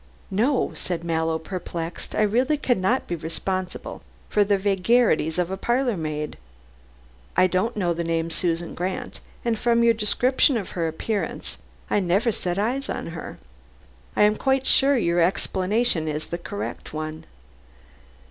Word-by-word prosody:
"No," 245 +8 +2
said 170 -2 -4
Mallow, 160 -1 0
perplexed. 170 -1 -5
"I - - +3
really 250 +8 +2
cannot 245 -3 +1
be 175 - -2
responsible 185 +3 -4 0.3
for 210 - +4
the 200 0 +2
vagaries 195 -4 +2
of 180 0 0
a 190 - -2
parlor 240 +2 +1
maid. 155 - -4 1.0
I 185 - +7
don't 185 +6 0
know 175 -4 +1
the 170 +1 -2
name 165 0 -1
Susan 170 0 -1
Grant, 190 +8 -4 0.3
and 230 -2 +1
from 235 -1 +3
your 230 0 +6
description 245 +4 +3
of 200 - -5
her 170 -2 -1
appearance, 175 +3 -3 0.3
I - - +2
never 195 +5 +2
set 180 -3 -2
eyes 255 +7 -1
on - - -3
her. 165 - -7 0.8
I - - +5
am 210 +1 +4
quite 265 -1 +1
sure 275 +1 +4
your 175 -6 +2
explanation 190 +1 +1
is 155 0 -2
the 170 - -5
correct 205 +4 -6
one. 155 0 -5
190 Hz, 150 wpm, -24 LUFS, 170-235 Hz, 1.0 s, I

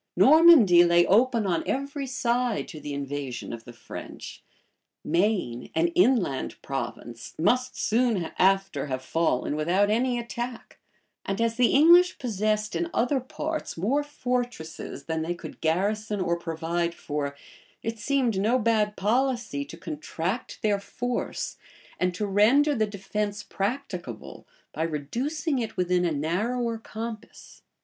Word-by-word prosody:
Normandy 280 - +8
lay 175 0 +5
open 230 +1 +3
on 175 -3 +1
every 275 +1 -2
side 245 -2 0
to 160 -6 -8
the 145 0 -6
invasion 140 -3 -4
of 115 -1 -8
the 120 - -9
French: 115 -1 -9 0.6
Maine, 170 - 0
an 165 +1 +3
inland 185 - +1
province, 120 -3 -6
must 250 +9 +1
soon 220 -6 +1
after 195 -6 +2
have 130 -1 -3
fallen 160 -3 0
without 180 +7 +2
any 245 +2 +1
attack; 240 +1 -6 0.4
and 195 +2 -3
as 230 0 +1
the 245 0 +4
English 345 +5 +6
possessed 215 -2 -1
in 340 - -1
other 250 +4 +2
parts 305 - -5
more 250 - +1
fortresses 245 - -4
than 160 -1 -2
they 170 +2 -2
could - - -10
garrison 205 +6 0
or 170 -2 +1
provide 170 0 -2
for, 145 -1 -4 0.5
it 225 0 -4
seemed 250 -5 +1
no 225 +6 +3
bad 215 -3 +1
policy 235 - 0
to 165 - -11
contract 170 +6 -4
their 205 -2 +2
force, 245 +4 -4 0.4
and 180 -1 0
to 210 - -2
render 230 +10 +4
the 220 -5 +1
defence 205 +1 -3
practicable, 195 - -5 0.3
by 155 - -4
reducing 250 - -2
it 225 -4 -4
within 180 0 +2
a 170 - +1
narrower 220 - -1
compass. 225 0 -8
205 Hz, 135 wpm, -26 LUFS, 165-245 Hz, 0.6 s, Normandy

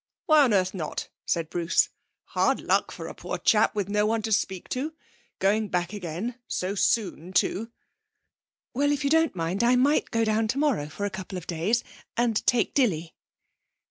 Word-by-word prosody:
'Why 310 -2 +6
on 240 - +2
earth 185 -1 +1
not?' 165 -6 -4 0.2
said 165 -2 0
Bruce. 170 0 +2 0.3
'Hard - - +1
luck - - +1
for - - -8
a - - -6
poor - - -5
chap 215 0 +3
with 205 -3 -1
no 210 +1 +1
one 225 0 0
to 220 - -3
speak 190 -3 0
to. 290 +5 -2 0.4
Going 210 +3 +2
back 180 -1 -1
again; 205 +6 -5
so 185 +2 -2
soon 190 -4 0
too.' 220 +5 +1 1.0
'Well, 285 +3 +2
if 290 0 -1
you 280 - +1
don't 320 -6 +3
mind 175 +5 -1
I 245 +1 +5
might 280 +4 +3
go 230 -1 +1
down 220 +1 +1
tomorrow 260 - 0
for 200 +7 -4
a 205 - -2
couple 190 0 -6
of 180 - -7
days, 180 +8 0 0.3
and 235 -2 +1
take 240 -2 +2
Dilly.' 170 - +1
210 Hz, 180 wpm, -26 LUFS, 185-240 Hz, 1.0 s, Why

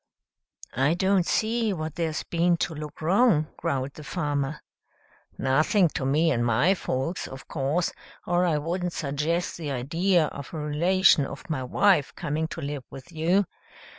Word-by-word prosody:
"I 135 +6 +2
don't 190 -1 +2
see 225 -1 +1
what 155 -3 -4
there's 160 -1 -2
been 170 0 +1
to 165 - -1
look 150 0 -8
wrong," 175 -3 +3
growled 135 0 -2
the 155 - -10
farmer. 145 -3 -2 0.8
"Nothing 160 - +3
to 135 -3 -3
me 155 +4 +3
and 120 -4 +1
my 125 - +3
folks, 165 -1 -3
of 135 0 -10
course, 150 +4 0 0.3
or 175 +1 +2
I 165 -4 +2
wouldn't 175 +3 -2
suggest 155 +4 -1
the 160 -4 -5
idea 165 +7 +1
of 140 +4 -9
a - - -3
relation 155 +1 +3
of 135 -2 -9
my 140 -4 -1
wife 165 +3 +2
coming 160 -1 -2
to 165 - -7
live 145 -2 -4
with 135 +6 -11
you. 175 +5 +2
160 Hz, 160 wpm, -26 LUFS, 140-175 Hz, 0.8 s, wrong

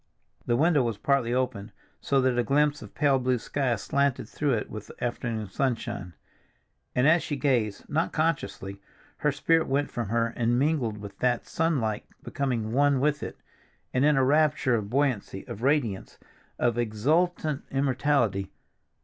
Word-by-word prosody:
The 120 - +3
window 155 +2 +3
was 115 -4 -1
partly 135 0 +1
open, 120 -5 -1 0.3
so 140 - +1
that 130 -1 +2
a - - +3
glimpse 145 +4 +2
of - - -12
pale 140 -3 +3
blue 130 0 +1
sky 130 +1 -1
slanted 140 +4 0
through 145 -3 -1
it 105 - -3
with 110 -1 -8
the - - -10
afternoon 115 -3 -2
sunshine. 115 -6 -3 0.8
And 125 +3 +4
as 165 +2 +5
she 145 - -3
gazed, 120 -8 0
not 160 +3 0
consciously, 135 -11 -2 0.4
her 150 - +1
spirit 160 +4 +2
went 140 +2 0
from 115 -4 -3
her 115 0 0
and 120 0 +1
mingled 130 -6 +1
with 100 -1 -10
that 125 -2 +1
sunlight, 135 -10 -1 0.2
becoming 120 -6 -2
one 140 +2 +3
with 145 +1 +1
it, - - -6 0.6
and 130 - +2
in 150 -1 +4
a 135 - +4
rapture 150 -1 +3
of 105 -3 -1
buoyancy, 125 -7 -1
of 105 - -7
radiance, 125 -8 0 0.4
of 120 -1 +1
exultant 150 +7 +1
immortality. 130 -7 +1
130 Hz, 160 wpm, -27 LUFS, 115-145 Hz, 0.8 s, as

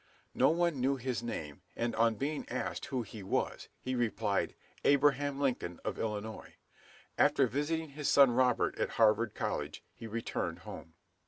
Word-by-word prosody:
No - - +4
one 170 -4 +1
knew 135 +2 +2
his 125 -2 -2
name, 80 -9 -5
and 115 0 -1
on 115 0 +3
being 145 +6 -3
asked - - -3
who 130 -3 -1
he 105 0 -9
was, 95 - -2
he 130 - -3
replied, 115 -4 0 0.3
"Abraham 140 0 +3
Lincoln 120 -11 -1
of - - -3
Illinois." 110 0 -4 0.6
After 135 - +5
visiting 150 +6 -1
his 145 +1 -2
son 140 -3 +7
Robert 125 0 +2
at - - +1
Harvard 110 0 +4
College, - - -3
he 115 - -9
returned 115 +1 -3
home. 80 0 -9
120 Hz, 155 wpm, -32 LUFS, 110-140 Hz, 0.6 s, son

